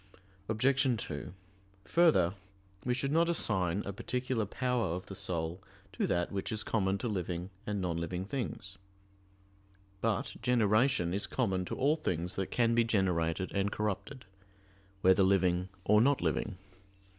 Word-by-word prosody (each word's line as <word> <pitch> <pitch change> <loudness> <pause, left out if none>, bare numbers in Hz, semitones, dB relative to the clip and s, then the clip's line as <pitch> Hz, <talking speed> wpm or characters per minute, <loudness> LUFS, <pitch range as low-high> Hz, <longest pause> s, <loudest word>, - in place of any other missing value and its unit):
Obj. 130 +3 +2
2: 75 -1 -6 0.5
Further, 155 - +4 0.5
we 125 0 0
should 135 +2 -1
not 165 +2 +3
assign 100 - +2
a 100 - -4
particular 125 0 -2
power 125 -6 -1
of 90 - -6
the - - -9
soul 85 -1 -2 0.3
to - - 0
that 85 0 0
which 100 +1 -3
is 110 0 -1
common 95 -3 0
to 120 - -3
living 90 -3 -3 0.2
and 105 -1 -1
non 90 -3 -1
living 90 +2 -3
things. 95 -5 -5 1.2
But 110 -3 -1
generation 110 -5 +2
is 100 - 0
common 95 -8 0
to - - -4
all 145 +4 +3
things 90 - -2
that 95 - -2
can 115 -1 +2
be 115 0 +4
generated 95 -5 0
and 100 0 0
corrupted, 105 +5 -3 0.8
whether 95 +1 +5
living 95 -1 +2 0.2
or 105 +1 +5
not 140 +3 +3
living. 105 -4 -1
100 Hz, 145 wpm, -32 LUFS, 90-120 Hz, 1.2 s, whether